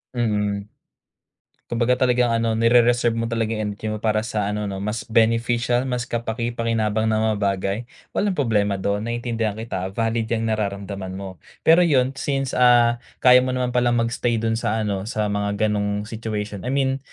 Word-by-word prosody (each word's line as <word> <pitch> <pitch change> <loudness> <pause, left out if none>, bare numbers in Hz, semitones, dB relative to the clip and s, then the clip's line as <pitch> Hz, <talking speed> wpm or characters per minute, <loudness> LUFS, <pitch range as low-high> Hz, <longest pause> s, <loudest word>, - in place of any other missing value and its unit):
Mm. 105 -3 -1 1.0
Kumbaga 120 +1 +1
talagang 125 -1 +2
ano 115 0 +1
nere-reserve 120 0 +4
mo 115 - -1
talagang 115 -1 -1
energy 105 +1 -5
mo 110 - -2
para 110 -1 +2
sa 105 -4 -1
ano 105 0 -2
'no 95 0 -5
mas 105 +2 -2
beneficial, 115 +2 +2
mas 125 -1 -1
kapakipakinabang 115 -2 -1
na 110 0 +1
mga - - -2
bagay, 100 0 0 0.3
walang 200 -1 0
problema 105 -8 +1
dun, 100 +3 -2
naintindihan 115 -2 -2
kita, 95 -5 -4
valid 115 0 0
'yang 115 0 -1
nararamdaman 100 -3 -3
mo. 95 -2 -8 0.3
Pero 165 +2 +6
'yun 135 -7 +3
since, 135 -2 -1
ah, 120 -1 +5 0.2
kaya 125 0 +8
mo 130 0 -1
naman 125 -1 -1
pala 120 -1 +2
mag-stay 115 0 0
dun 115 0 0
sa 110 0 0
ano 100 -1 -2
sa 110 -3 -1
mga 100 +1 -1
gano'ng 105 -1 -1
situation, 105 -2 -5
I - - -1
mean, 135 -1 +1
115 Hz, 165 wpm, -22 LUFS, 105-120 Hz, 1.0 s, kaya